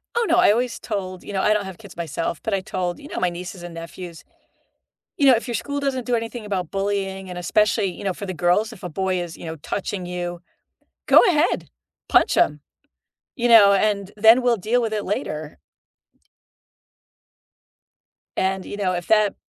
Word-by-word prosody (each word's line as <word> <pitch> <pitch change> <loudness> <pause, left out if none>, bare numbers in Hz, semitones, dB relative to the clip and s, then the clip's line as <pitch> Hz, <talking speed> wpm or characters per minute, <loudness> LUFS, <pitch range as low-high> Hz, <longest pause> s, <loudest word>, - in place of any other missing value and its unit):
Oh 470 0 +2
no, - - +3
I - - +6
always 240 +3 -1
told 185 -4 -5
you 205 - -8
know, 190 - 0
I 210 - +4
don't 210 -2 -1
have 190 -2 -8
kids 200 -4 -13
myself, 165 -1 -3
but 220 - -2
I 195 - +2
told, 180 -1 -3
you 290 - -11
know, - - -5
my 180 - +2
nieces 180 +1 -8
and 175 -1 -8
nephews, 165 +1 -9 0.9
you 285 - +3
know, 265 - +8
if 235 +2 0
your 240 - -2
school 285 +6 -3
doesn't 270 -3 -2
do 245 - +1
anything 230 0 -4
about 185 -5 -3
bullying, 195 -1 -2
and 180 - -6
especially, 210 +4 +2
you 180 -2 -5
know, 195 -2 0
for 200 - -7
the 185 - -4
girls, 180 +6 +1
if 205 - -15
a 180 - -4
boy 185 +2 -1
is, 170 -2 -7
you - - -10
know, 160 0 -5
touching 190 +3 -4
you, 175 -1 -4 0.7
go - - +8
ahead, 330 -2 +1 0.4
punch - - +4
him, 150 0 +2 0.8
you 245 -2 0
know, 220 -4 +8
and 200 0 +1
then 225 +4 +7
we'll 245 -2 +2
deal 225 +6 +1
with 225 -2 -2
it 210 -1 -2
later. 155 -6 -4 2.8
And, 190 0 0
you 205 - -7
know, 190 -3 0
if 175 -1 -4
that 215 -2 +3
195 Hz, 195 wpm, -22 LUFS, 180-220 Hz, 2.8 s, know